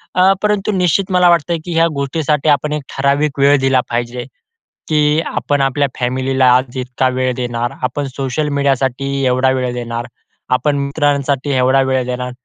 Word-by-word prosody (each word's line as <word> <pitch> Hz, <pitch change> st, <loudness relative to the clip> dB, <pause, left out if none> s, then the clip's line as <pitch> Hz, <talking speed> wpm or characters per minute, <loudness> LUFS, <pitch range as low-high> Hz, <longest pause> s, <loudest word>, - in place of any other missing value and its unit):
अ, 185 Hz, +1 st, +5 dB
परंतु 210 Hz, 0 st, +1 dB
निश्चित 185 Hz, 0 st, +1 dB
मला 180 Hz, -1 st, +4 dB
वाटतं 170 Hz, 0 st, +2 dB
की 175 Hz, -, -4 dB
ह्या 165 Hz, 0 st, +4 dB
गोष्टीसाठी 150 Hz, +2 st, 0 dB
आपण 150 Hz, +2 st, -4 dB
एक 150 Hz, -, -2 dB, 0.2 s
ठराविक 140 Hz, +1 st, +1 dB
वेळ 140 Hz, +1 st, +5 dB
दिला 135 Hz, -1 st, +2 dB
पाहिजे 120 Hz, +1 st, -3 dB, 0.6 s
की 150 Hz, 0 st, +2 dB
आपण 145 Hz, -1 st, 0 dB
आपल्या 135 Hz, +1 st, +1 dB
फॅमिलीला 130 Hz, +1 st, 0 dB
आज 130 Hz, 0 st, -1 dB
इतका 130 Hz, +1 st, -1 dB
वेळ 130 Hz, 0 st, 0 dB
देणार, 120 Hz, -1 st, -3 dB
आपण 125 Hz, +3 st, -2 dB
सोशल 135 Hz, +3 st, -2 dB
मीडियासाठी 135 Hz, -1 st, 0 dB, 0.2 s
एवढा 130 Hz, +1 st, +2 dB
वेळ 125 Hz, -1 st, -1 dB
देणार, 120 Hz, -1 st, -4 dB, 0.5 s
आपण 145 Hz, +3 st, +1 dB
मित्रांसाठी 140 Hz, -1 st, 0 dB
एवढा 130 Hz, +1 st, +3 dB
वेळ 130 Hz, -1 st, 0 dB
देणार. 125 Hz, 0 st, -4 dB
135 Hz, 160 wpm, -16 LUFS, 125-150 Hz, 0.6 s, अ